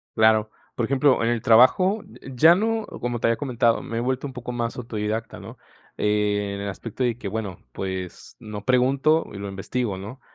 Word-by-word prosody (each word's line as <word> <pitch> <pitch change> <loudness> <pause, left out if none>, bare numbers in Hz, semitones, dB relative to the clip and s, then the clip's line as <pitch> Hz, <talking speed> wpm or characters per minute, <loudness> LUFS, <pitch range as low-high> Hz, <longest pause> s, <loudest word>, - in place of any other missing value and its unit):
Claro. 110 -1 +4 0.2
Por 120 - 0
ejemplo, 135 0 +3
en 115 - +2
el 120 -1 0
trabajo, 130 - +5 0.2
eh, 135 - -9
ya 160 +7 +7
no 225 +2 0 0.2
como 120 0 -2
te 115 - +1
había 115 - +3
comentado, 120 -4 +1
me 115 - -5
he - - +1
vuelto 130 +3 -1
un 130 - -9
poco 125 -1 -6
más 120 0 -3
autodidacta, 110 -2 -4
¿no? - - -11 0.4
Eh, 105 -1 0
en 100 - -5
el 100 - -3
aspecto 115 +5 -5
de 120 -2 0
que 110 - -6
bueno, 100 -2 -4
pues, 95 -2 -6
no 105 -2 -8
pregunto 135 +5 +3
y - - -7
lo 100 0 -5
investigo, 100 +2 -3
¿no? 105 +8 -9
115 Hz, 205 wpm, -24 LUFS, 105-130 Hz, 0.4 s, ya